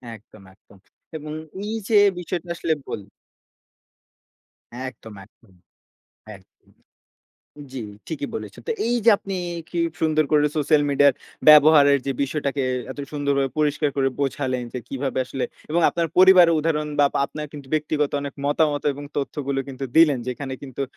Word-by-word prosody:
একদম, 105 -1 -18
একদম 100 0 -22 0.4
এবং 150 0 -8 0.3
এই 220 +1 -3
যে 215 - +5 0.2
বিষয়টা 175 0 -5
আসলে 165 -1 0
বলি। 100 -2 -6 1.8
একদম, 110 -4 -14
একদম। 105 -2 -27 0.8
একদম। 95 - -23 1.0
জ্বী, 130 - -5 0.3
ঠিকই 145 -3 -4
বলেছেন। - - -7
তো - - +2
এই 240 - +1
যে 230 - +7
আপনি 195 -1 -6 0.4
কি 175 - -4 0.2
সুন্দর 155 -1 +2
করে 150 -1 +4
সোশ্যাল 150 0 +3
মিডিয়া 140 0 +5 0.4
ব্যবহারের 150 -2 +7
যে 135 - 0
বিষয়টাকে 140 -1 -2 0.3
এত 140 - -9
সুন্দরভাবে 140 -2 0
পরিষ্কার 150 0 +1
করে 135 -1 +2
বোঝালেন। 130 -2 -1
যে - - -2
কিভাবে 135 -1 -3
আসলে 135 - -3 0.3
এবং 170 +2 +2
আপনার 170 -1 -1
পরিবারের 185 -3 +7
উদাহরণ 150 -1 -1
বা 145 - +6
আপ - - -22
আপনার 150 0 -7
কিন্তু 145 -2 -10
ব্যক্তিগত 150 -1 0
অনেক 140 -1 -6
মতামত 145 0 +1
এবং 145 +1 -9
তথ্যগুলো 140 -1 -2
কিন্তু 135 0 -6
দিলেন। 150 -5 +6
যেখানে 130 +1 -5
কিন্তু 140 0 -5
145 Hz, 145 wpm, -23 LUFS, 135-155 Hz, 1.8 s, যে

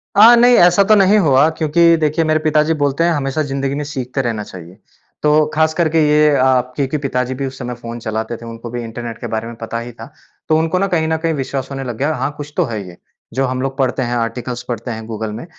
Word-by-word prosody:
अ, 225 +4 +8
नहीं 245 +1 +5
ऐसा 175 +3 +5
तो 215 +2 +4
नहीं 200 +1 +5
हुआ 140 +1 +5
क्योंकि 170 +2 +4
देखिए 155 +1 +1
मेरे 155 0 +2
पिताजी 155 +1 +2
बोलते 145 +2 +1
हैं 170 - +3
हमेशा 145 0 -1
ज़िंदगी 135 0 -2
में 150 - -3
सीखते 135 -2 -4
रहना 115 -4 -3
चाहिए। 90 -2 -12 0.5
तो 150 0 +4
ख़ास 160 0 +2
करके 165 -1 +1
ये 150 0 +4
अ, 130 -1 +3
क्योंकि 140 +1 -1
पिताजी 130 -3 -2
भी - - 0
उस 130 0 -9
समय 125 - -4
फ़ोन 120 0 -8
चलाते 110 +1 -4
थे, 115 - -12
उनको 115 0 -8
भी 120 +1 -5
इंटरनेट 115 0 -7
के - - -6
बारे 110 0 -3
में 120 - -8
पता 115 +1 -4
ही 120 +1 -7
था। 115 -1 -12 0.4
तो 155 - +4
उनको 165 +3 0
ना 195 - +1
कहीं 165 -4 0
न 160 0 0
कहीं 165 0 -1
विश्वास 135 -2 -4
होने 135 0 -4
लग 120 -3 -5
गया। 145 +5 0
हाँ, 145 - -2
कुछ 150 0 -8
तो 180 - +3
है 110 -6 -4
ये 85 -1 -12 0.4
जो 135 +3 0
हम 130 0 -3
लोग 135 0 -3
पढ़ते 130 -1 0
हैं, 120 0 -2
आर्टिकल्स 120 +1 -3
पढ़ते 120 +1 -4
हैं, 110 -1 -6
गूगल 110 -1 -4
में। 115 +7 -7
135 Hz, 250 wpm, -17 LUFS, 120-155 Hz, 0.5 s, अ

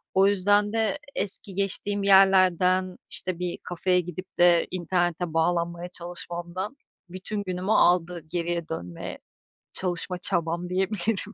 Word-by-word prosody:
O 190 +1 +6
yüzden 205 +1 +3
de 225 +6 0 0.2
eski 195 -1 -3
geçtiğim 200 +1 -1
yerlerden, 185 -1 +4
işte, 180 -2 -4
bir 180 -1 -3
kafeye 180 +1 +1
gidip 185 +2 -9
de 175 -1 +5
internete 175 -1 -1
bağlanmaya 170 +1 0
çalışmamdan 175 +5 -6 0.3
bütün 195 +3 -4
günümü 185 +2 -2
aldı 175 -3 +3
geriye 170 -1 -2
dönmeye, 90 - -6 0.5
çalışma 180 0 -3
çabam 170 -1 -1
diyebilirim. 200 +3 -1
180 Hz, 115 wpm, -26 LUFS, 175-195 Hz, 0.5 s, O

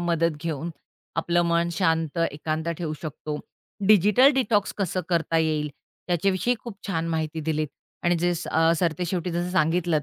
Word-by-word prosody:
मदत 170 -2 +1
घेऊन 165 0 -3 0.5
आपलं 175 +1 +2
मन 170 0 +2
शांत, 165 -2 +1
एकांत 155 +3 -3
ठेवू 160 -3 -3
शकतो. 150 -1 -5 0.5
डिजिटल 210 +6 +6
डिटॉक्स 210 -6 +2
कसं 185 -1 0
करता 165 -1 +1
येईल, 155 -2 +1 0.4
त्याच्याविषयी 185 +6 +1
खूप 225 -2 -9
छान 165 -3 -1
माहिती 160 -1 -2
दिलीत 155 0 -1 0.4
आणि 175 - +4
जे 175 +1 +2 0.2
अ, 165 +1 +4
सरते 170 0 0
शेवटी 180 0 -2
जसं 175 +1 -2
सांगितलंत, 170 -3 +2
170 Hz, 150 wpm, -25 LUFS, 160-180 Hz, 0.5 s, डिजिटल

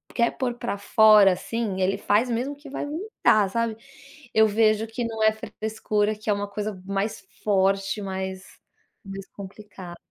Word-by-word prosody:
quer 235 -1 +2
pôr 245 -2 -1
pra 240 -3 -3
fora, 210 -1 +6
assim, 210 0 -3
ele 185 +1 +1
faz 220 +5 +2
mesmo 250 +5 -2
que 290 +1 -15
vai 270 - -4
vomitar, 295 - +1
sabe. 230 0 -1 0.6
Eu 220 0 +5
vejo 215 +1 +2
que 235 +2 -4
não 225 -1 -4
é 220 - +6
frescura, 215 -1 -2
que 215 +1 -7
é - - +4
uma 205 0 -3
coisa 205 -2 -5
mais 200 +2 -3 0.2
forte, 195 0 +1
mais 190 -1 -6 0.5
mais 195 0 -8
complicada. 195 -3 -10
215 Hz, 160 wpm, -25 LUFS, 195-225 Hz, 0.6 s, fora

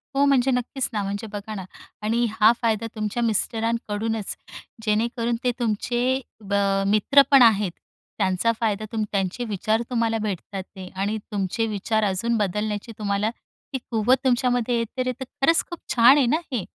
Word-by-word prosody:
हो, 280 +1 +4
म्हणजे 270 -2 +3
नक्कीच 250 +1 -1
ना, 210 - 0
म्हणजे 200 +3 -4
बघा 205 +1 -5
ना 190 - -5 0.4
आणि 230 +3 +1
हा 220 0 +5
फायदा 225 -1 0
तुमच्या 215 +2 -2
मिस्टरांकडूनच 225 -1 -1 0.5
जेणेकरून 230 +2 0
ते 250 - +2
तुमचे 240 +3 0 0.3
ब - - -1 0.3
मित्र 215 +7 +5
पण 275 -2 +8
आहेत, 210 -5 +5 0.5
त्यांचा 190 +3 +2
फायदा 215 -2 0
तुम 220 -1 -1
त्यांचे 195 +4 -1
विचार 215 +2 0
तुम्हाला 230 -2 +1
भेटत 200 -1 -4
आहेत 190 -1 -7
आणि 205 +3 -1
तुमचे 200 +2 -1
विचार 215 +1 -1
अजून 210 +4 0
बदलण्याची 210 +2 -2
तुम्हाला 205 +1 0 0.4
ती - - +1
कुवत 230 +4 +3
तुमच्यामध्ये 245 -1 +1
आहे 230 - +1
तर 255 0 0
ते - - -3
खरंच 275 +5 +2
खूप 345 - -7 0.2
छान 245 +4 +7
आहे 275 - +4
ना, 275 +7 +2
हे. 235 -8 -2
225 Hz, 160 wpm, -24 LUFS, 205-240 Hz, 0.5 s, पण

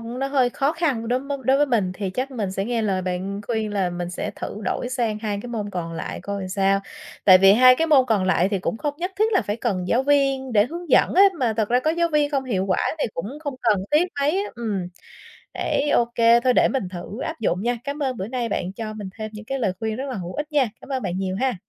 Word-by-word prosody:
nó 240 +4 -4
hơi 265 -3 +2
khó 275 +4 0
khăn 285 -9 -1
đối 250 +1 +1
mới 280 +1 -4
đối 265 +3 +4
với 290 +1 +3
mình 215 -8 +1
thì 195 -1 -3
chắc 255 +8 -3
mình 220 -7 -3
sẽ 195 +1 -2
nghe 235 0 -1
lời 190 -3 0
bạn 185 +2 -3
khuyên 220 -3 -2
là 195 -3 0
mình 175 0 -4
sẽ 180 - -4
thử 210 - -6
đổi 245 - -2
sang 235 -4 -1
2 210 -2 -3
cái 245 - -7
môn 215 -4 -4
còn 170 -3 -4
lại 165 - -5
coi 200 0 -4
làm 185 - -5
sao. 195 +1 +2 0.4
Tại 185 -2 +8
vì 195 +1 +7
2 255 +3 +7
cái 325 - +1
môn 280 -5 +5
còn 215 -6 +1
lại 185 -1 +2
thì 200 -1 -1
cũng 190 - -2
không 290 +2 -2
nhất 360 +2 -2
thiết 440 +1 +2
là 390 - +3
phải 205 - -3
cần 195 -7 -2
giáo 245 - +2
viên 275 -2 +1
để 210 0 +4
hướng 340 +3 -8
dẫn - - +4
á, 385 - +7 0.2
mà 245 -5 +1
thật 215 -2 0
ra 245 +1 +3
có 310 - +1
giáo 340 +1 +1
viên 295 -1 +2
không 275 -2 -1
hiệu 195 -7 -1
quả 190 - +1 0.2
thì - - 0
cũng 210 - -5
không 285 -3 -4
cần 210 -5 +2
thiết 300 +3 +4 0.2
mấy 280 +1 +3
á. - - -7
Ừm, 215 -6 -3 0.7
ấy, 290 - -1
ô 240 - +3
kê, 230 0 +5
thôi 250 +1 +2
để - - +4
mình 260 -9 -2
thử 185 +5 -7
áp 320 +2 -4
dụng 185 -4 0
nha, 240 +1 0
cám 285 +2 -3
ơn 260 -3 -1
bữa 190 - -4
nay 240 -1 -2
bạn 185 -2 -3
cho 215 +1 -5
mình 210 -3 -7
thêm 215 -1 -5
những 215 0 -9
cái 270 +3 -3
lời 205 -7 0
khuyên 220 -1 -2
rất 270 +4 -4
là 255 - -4
hữu 180 -2 -6
ích 300 +1 -4
nha. 280 -6 +2
Cảm - - -13
ơn 265 -2 -2
bạn 175 - -2
nhiều 190 -1 -2
ha, 260 -1 +1
230 Hz, 280 wpm, -23 LUFS, 195-270 Hz, 0.7 s, Tại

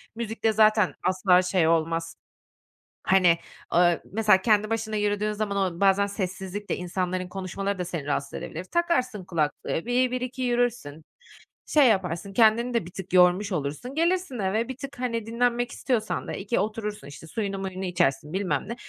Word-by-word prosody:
müzikte 225 -1 -1
zaten 215 -2 +4
asla 185 0 +4
şey 180 -2 +1
olmaz 165 0 0 0.9
hani, 180 -3 +4 0.4
eee, 175 -1 +4
mesela 210 -3 +4
kendi 215 -1 +3
başına 220 -1 -2
yürüdüğün 210 0 0
zaman 210 -1 -2 0.2
o - - -11
bazen 200 0 +4
sessizlikte 195 0 -4
insanların 180 0 -3
konuşmaları 195 +1 -4
da 180 - -2
seni 170 -5 -5
rahatsız 140 -1 -2
edebilir. 170 +3 -6
Takarsın 255 - 0
kulaklığı 165 +1 -2
bir 250 +1 +2
bir 255 - -2
iki 255 +1 -5
yürürsün, 240 - -1 0.6
şey 290 -4 +5
yaparsın 190 -2 0
kendini 235 +3 +4
de 230 -8 0
bir 175 - -10
tık 190 0 -8
yormuş 180 +3 +4
olursun, 155 - -4
gelirsin 340 -5 0
eve 210 +4 0
bir 260 - -6
tık 275 -1 -8
hani 230 -3 -2
dinlenmek 240 +1 0
istiyorsan 245 -5 -2
da - - -4
iki 200 +4 -1
oturursun, 210 -2 -3
işte 145 +3 -11
suyunu 195 +1 -3
muyunu 190 0 -4
içersin 155 -3 0
bilmem 190 -1 -1
ne. 235 - -3
200 Hz, 160 wpm, -26 LUFS, 180-230 Hz, 0.9 s, şey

